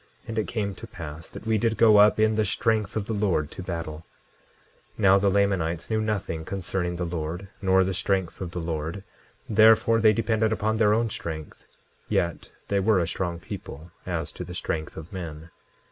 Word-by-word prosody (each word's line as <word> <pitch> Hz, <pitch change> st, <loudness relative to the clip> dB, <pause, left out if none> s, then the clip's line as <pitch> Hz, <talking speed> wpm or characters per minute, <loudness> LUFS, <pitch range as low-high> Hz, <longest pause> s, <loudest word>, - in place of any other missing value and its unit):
And 115 Hz, 0 st, -2 dB
it 110 Hz, -, -1 dB
came 105 Hz, -4 st, -2 dB
to 115 Hz, -, -10 dB
pass 80 Hz, -5 st, -8 dB
that -, -, -10 dB
we 110 Hz, -1 st, +2 dB
did 115 Hz, +1 st, +1 dB
go 110 Hz, -2 st, +6 dB
up 105 Hz, +1 st, +6 dB
in 110 Hz, 0 st, +4 dB
the 110 Hz, 0 st, +2 dB
strength 110 Hz, -1 st, 0 dB
of 105 Hz, -, -2 dB
the 110 Hz, -, -3 dB
Lord 95 Hz, -8 st, 0 dB
to -, -, -7 dB
battle. 80 Hz, -3 st, -5 dB, 0.9 s
10:11 -, -, -20 dB
Now, 100 Hz, -1 st, +6 dB
the 100 Hz, 0 st, +3 dB
Lamanites 95 Hz, -3 st, 0 dB
knew 110 Hz, 0 st, +2 dB
nothing 100 Hz, -7 st, -2 dB
concerning 90 Hz, -1 st, -3 dB
the 90 Hz, 0 st, -2 dB
Lord, 85 Hz, +3 st, -4 dB
nor 95 Hz, -1 st, +4 dB
the 95 Hz, +1 st, -1 dB
strength 95 Hz, -1 st, -1 dB
of 90 Hz, -, -3 dB
the 90 Hz, -, -5 dB
Lord, 80 Hz, +3 st, -4 dB, 0.4 s
therefore 110 Hz, +1 st, +5 dB
they 110 Hz, -1 st, +7 dB
depended 110 Hz, 0 st, +1 dB
upon 110 Hz, 0 st, 0 dB
their 105 Hz, -1 st, +4 dB
own 115 Hz, -1 st, 0 dB
strength. 80 Hz, -4 st, -7 dB, 0.4 s
Yet 85 Hz, -2 st, -1 dB, 0.2 s
they 100 Hz, -, +1 dB
were 105 Hz, +1 st, +3 dB
a 85 Hz, -2 st, +1 dB
strong 85 Hz, 0 st, -3 dB
people, 80 Hz, -1 st, -8 dB, 0.2 s
as 80 Hz, -4 st, -2 dB
to -, -, -7 dB
the 90 Hz, -, -8 dB
strength 80 Hz, -3 st, -3 dB
of 80 Hz, +5 st, -9 dB
men. 80 Hz, -3 st, -7 dB
95 Hz, 195 wpm, -26 LUFS, 85-110 Hz, 0.9 s, they